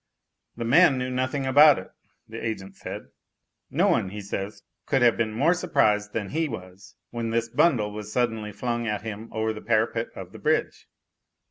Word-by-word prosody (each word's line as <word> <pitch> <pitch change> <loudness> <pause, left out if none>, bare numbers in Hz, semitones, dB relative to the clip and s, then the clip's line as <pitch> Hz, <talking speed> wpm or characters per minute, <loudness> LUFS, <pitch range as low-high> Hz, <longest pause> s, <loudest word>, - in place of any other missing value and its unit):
"The 115 - -4
man 140 +3 +5
knew 130 0 -2
nothing 130 +2 -1
about 145 +2 +7
it," - - -8 0.4
the - - -8
agent 100 -4 -4
said. - - -8 0.6
"No - - +2
one, 95 - +2
he 105 +2 -7
says, 100 +1 -5 0.2
could 135 -3 +2
have 120 -2 +5
been 115 -1 -1
more 140 +11 +3
surprised 125 - +1
than 105 -3 -3
he 160 0 -1
was 95 -4 -10 0.2
when 115 -1 -3
this 115 0 -1
bundle 115 -7 +2
was 105 0 -7
suddenly 115 -3 -1
flung 120 +2 -3
at 105 -1 -2
him 110 0 -6
over 110 0 -1
the 110 - -9
parapet 115 0 +1
of - - -8
the - - -11
bridge." - - -1
115 Hz, 185 wpm, -25 LUFS, 105-130 Hz, 0.6 s, about